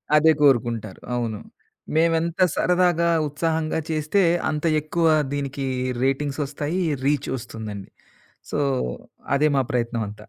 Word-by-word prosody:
అదే 160 +1 +6
కోరుకుంటారు, 120 -7 +2
అవును. 115 -3 -2 0.6
మేమెంత 165 +2 +2
సరదాగా, 175 -2 +2 0.2
ఉత్సాహంగా 160 +1 -1
చేస్తే 155 +5 +1 0.3
అంత 150 +1 -2 0.2
ఎక్కువ 165 +2 0 0.3
దీనికి 140 -1 -3 0.4
రేటింగ్సొస్తాయి, 145 +4 -1 0.3
రీచ్ 145 -1 +1
ఒస్తుందండి. 110 -4 -7 0.6
సో, - - -1 0.8
అదే 150 +2 +3
మా - - +4
ప్రయత్నం 120 -2 -1
అంతా. 105 0 -12
145 Hz, 105 wpm, -23 LUFS, 120-160 Hz, 0.8 s, అదే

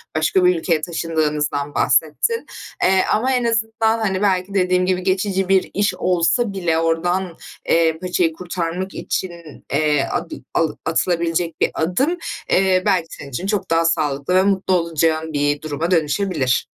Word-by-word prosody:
başka 170 +4 +2
bir 180 - +4
ülkeye 165 -2 0
taşındığınızdan 150 -3 -2
bahsettin, 155 - +1 0.4
eee, 190 0 +4
ama 250 +5 +1
en 250 - +1
azından, 225 0 +1
hani, 195 -3 -1
belki 190 -1 0
dediğim 185 -1 +2
gibi 185 0 0
geçici 190 0 0
bir 190 -1 +2
iş 205 0 +1
olsa 185 +5 +1
bile 175 -4 0
oradan, 170 +2 0 0.3
eee, 165 -1 +3
paçayı 180 -3 0
kurtarmak 180 +1 -4
için, 185 - -3 0.4
eee, 150 -1 +2
adı - - -3 0.2
alı 165 -2 0
atılabilecek 170 0 -1
bir - - +3
adım, 225 - 0 0.3
eee, 185 -1 +3
belki 185 -5 +2
senin 140 - -10
için 175 +9 -4
çok 205 -2 -1
daha 165 0 +2
sağlıklı 155 0 0
ve 185 - +5
mutlu 190 -1 +1
olacağın 165 -2 +1
bir 145 0 0
duruma 155 +3 -3
dönüşebilir. 155 -4 +1
175 Hz, 150 wpm, -20 LUFS, 160-190 Hz, 0.4 s, ve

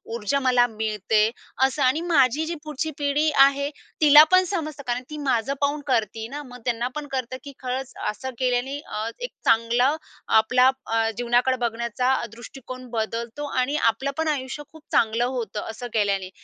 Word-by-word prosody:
ऊर्जा 235 +5 0
मला 250 -2 +4
मिळते. 215 -1 +1 0.4
अस 270 +3 -2
आणि 270 +3 +3
माझी 285 -2 +3
जी 340 +1 -3
पुढची 305 +1 -3
पिढी 290 +2 +1
आहे, 280 +1 +2 0.3
तिला 300 0 +9
पण 370 0 +6
समजतं 310 -6 -4
कारण 245 +1 -1
ती 300 - -6
माझं 275 -3 0
पाहून 285 +1 0
करती 225 -3 0
ना. 285 +5 -6
मग 250 -1 -11
त्यांनापण 250 +5 -2
कळतं, 255 -1 -3
की 280 - -9
खरंच 260 +1 -4 0.2
असं 260 +5 -5
केल्याने 255 +2 0
अ, 215 -6 -5
एक - - -5
चांगलं 235 +5 +3 0.4
आपला 250 +4 +4 0.2
अ, 225 0 +1
जीवनाकडे 245 +2 +2
बघण्याचा 235 +2 0 0.2
दृष्टिकोन 255 +2 -10
बदलतो 230 +5 -3 0.2
आणि 280 +4 -1 0.2
आपलंपण 280 +7 -3
आयुष्य 285 -1 -2
खूप 315 -1 -15
चांगलं 230 +1 +2
होतं, 235 -5 -3
असं 225 +2 -6
केल्याने. 200 -3 0
255 Hz, 155 wpm, -24 LUFS, 230-285 Hz, 0.4 s, तिला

